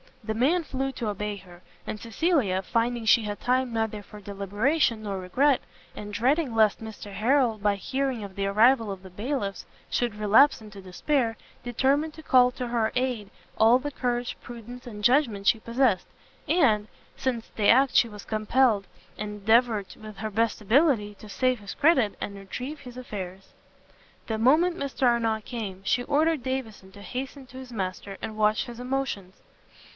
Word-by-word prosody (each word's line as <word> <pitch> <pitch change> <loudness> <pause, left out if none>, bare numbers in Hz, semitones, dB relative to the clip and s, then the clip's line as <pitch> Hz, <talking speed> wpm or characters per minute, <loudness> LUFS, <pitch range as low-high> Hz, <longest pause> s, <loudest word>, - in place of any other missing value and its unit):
The 220 +1 -2
man 305 +10 +2
flew 270 -2 -3
to 230 -5 -3
obey 210 0 -3
her; 175 -2 -15 0.2
and 215 - -5
Cecilia, 230 - +1
finding 230 +3 -1
she 225 +1 +5
had 205 -1 -4
time 255 0 0
neither 220 -2 -1
for 210 +1 -12
deliberation 210 - 0
nor 200 -2 -3
regret, 255 +10 +2 0.3
and 210 0 -7
dreading 260 +3 +1
lest 220 -1 +3
Mr 220 -2 -8
Harrel, 230 +3 +2
by 205 0 +2
hearing 260 +2 -2
of 195 -2 -9
the 195 - -1
arrival 225 +2 +4
of 190 -1 -8
the 190 - -10
bailiffs, 205 +1 -3 0.2
should 240 -3 -1
relapse 220 +7 +5
into 210 -2 -11
despair, 225 - -1 0.3
determined 275 +6 +1
to 315 - -11
call 250 -3 +5
to 250 -1 -5
her 230 -2 0
aid 250 -5 -1 0.3
all 225 +3 +6
the 290 +3 -5
courage, 245 -2 -2
prudence, 240 +1 -10
and 210 -3 -8
judgment 235 -5 +2
she 225 - +5
possessed, 235 -4 +1 0.4
and, 225 -11 +3 0.3
since 240 -4 -3
to 210 -2 0
act 265 +3 +5
she 235 - +5
was 210 -1 -10
compelled, 215 -1 +2 0.3
endeavour 210 +2 +2 0.2
with 215 -2 -10
her 215 +2 -4
best 225 +2 0
ability, 225 - +3
to 215 - -13
save 255 +3 +1
his 200 -1 -7
credit, 280 -9 +3
and 200 - -4
retrieve 250 +9 -7
his 250 -1 -11
affairs. 195 -6 -7 0.7
The 220 -1 -2
moment 320 +9 +4
Mr 280 -3 -4
Arnott 225 -2 +1
came, 205 -6 -5
she 245 +5 +1
ordered 305 +2 +2
Davison 235 -7 -4
to 200 - -12
hasten 265 +5 -6
to 255 +1 -12
his 260 -1 -9
master, 195 -2 -4
and 215 - -5
watch 215 +3 +2
his 240 -2 -9
motions. 250 -7 -3
230 Hz, 170 wpm, -26 LUFS, 205-260 Hz, 0.7 s, all